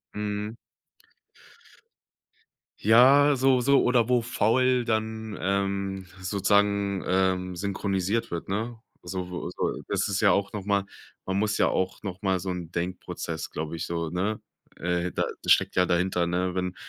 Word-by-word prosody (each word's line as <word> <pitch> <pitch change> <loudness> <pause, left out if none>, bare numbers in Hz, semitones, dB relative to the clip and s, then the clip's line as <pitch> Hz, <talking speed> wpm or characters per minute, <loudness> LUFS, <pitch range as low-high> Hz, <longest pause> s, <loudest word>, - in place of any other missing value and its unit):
Mhm. 105 +1 -3 2.2
Ja, 135 +6 +6
so 130 -1 +3
so 140 +3 +4
oder 120 -2 +3
wo 125 -1 +3
faul 120 +2 +2
dann, 110 -1 -2
ähm, 100 0 -1 0.2
sozusagen, 100 +1 +1
ähm, 95 -1 +1
synchronisiert 100 +2 -1
wird, 85 +1 -5
ne? 110 +3 -3 0.2
So 90 -1 -5
so 90 - -3
das - - 0
ist 100 -2 -1
ja - - +5
auch 100 +1 0
noch 105 - -4
mal 100 0 +1 0.4
man 95 +1 -1
muss 105 0 0
ja - - +3
auch 95 0 -2
noch 95 -2 -6
mal 95 -2 +1
so 95 +2 -5
'n 85 -2 -6
Denkprozess, 85 -2 -4
glaube 80 +1 -5
ich, 80 0 -4
so, 85 -2 -2
ne 95 +5 -1 0.4
äh, 90 0 -1
da - - -1 0.2
da - - -5
steckt - - +4
ja 90 -1 +3
dahinter, 90 0 +1
ne, 90 +1 -1
wenn 90 0 -2
100 Hz, 155 wpm, -26 LUFS, 90-110 Hz, 2.2 s, Ja